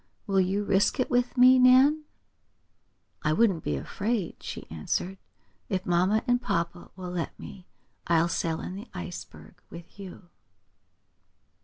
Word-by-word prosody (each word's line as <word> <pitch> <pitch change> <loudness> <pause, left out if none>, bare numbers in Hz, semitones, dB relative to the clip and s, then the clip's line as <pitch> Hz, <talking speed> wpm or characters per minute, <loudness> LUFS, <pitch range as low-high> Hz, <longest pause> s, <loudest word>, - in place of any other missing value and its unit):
Will 195 -2 +2
you 195 +3 0
risk 200 +7 +1
it 255 - 0
with 245 +1 +1
me, 255 +1 +7
Nan?" 265 +5 +5 1.2
"I 155 - +1
wouldn't 190 -3 +2
be 75 - -1
afraid," 200 - -3
she - - -7
answered. 175 - -3 0.5
"If 190 -2 -2
mamma 185 +5 +2
and 245 0 +1
papa 170 -5 -3
will 180 -1 -7
let 175 -2 -4
me 185 -2 -11 0.4
I'll 170 0 +3
sail 165 -1 -2
in - - -6
the 205 +6 -8
Ice 180 0 -6
Bird - - -16
with 170 +4 -12
you." 185 -2 -11
190 Hz, 145 wpm, -27 LUFS, 175-235 Hz, 1.2 s, me